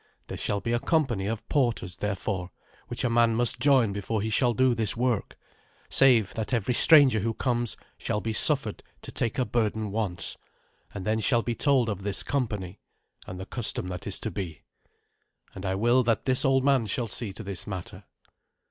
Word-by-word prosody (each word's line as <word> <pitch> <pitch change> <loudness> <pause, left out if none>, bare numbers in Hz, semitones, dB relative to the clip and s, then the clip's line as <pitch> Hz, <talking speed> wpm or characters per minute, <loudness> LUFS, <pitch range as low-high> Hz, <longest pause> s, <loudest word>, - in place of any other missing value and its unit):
There - - -5
shall 100 -1 -1
be 115 - -2
a 120 - +2
company 125 -11 0
of 110 0 -4
porters, 115 - 0
therefore, 100 -2 -3 0.4
which - - -3
a - - +3
man 115 -1 +3
must 120 +1 0
join 130 -6 +3
before 100 +2 -2
he 110 - -2
shall 120 +1 +2
do 130 +1 +3
this 115 -1 0
work, 120 -4 -1 0.5
save 120 -7 +4
that 110 0 -4
every 115 0 +1
stranger 140 -4 +6
who 115 +2 -2
comes 120 -3 -1 0.2
shall 105 - -1
be 110 +1 -3
suffered - - 0 0.2
to - - -8
take 115 - -2
a 130 - +1
burden 110 -3 -1
once, 100 -6 -1 0.5
and 100 - -7
then 110 +1 +1
shall 115 +3 +2
be 120 - -1
told 135 -1 +2
of 100 -3 -3
this 100 0 -3
company, 105 -9 -3 0.5
and 90 0 -7
the 95 - -6
custom 105 -5 -2
that 90 -1 -6
is - - -1
to - - -3
be. 85 -6 -6 0.9
And 95 0 -6
I 95 - 0
will 120 +5 +3
that 115 -3 0
this 130 -1 +3
old 135 -2 +3
man 135 -5 +3
shall 115 +4 -2
see 110 0 -5
to 110 - -8
this 100 -3 -6
matter." 95 -3 -7
115 Hz, 195 wpm, -27 LUFS, 100-125 Hz, 0.9 s, stranger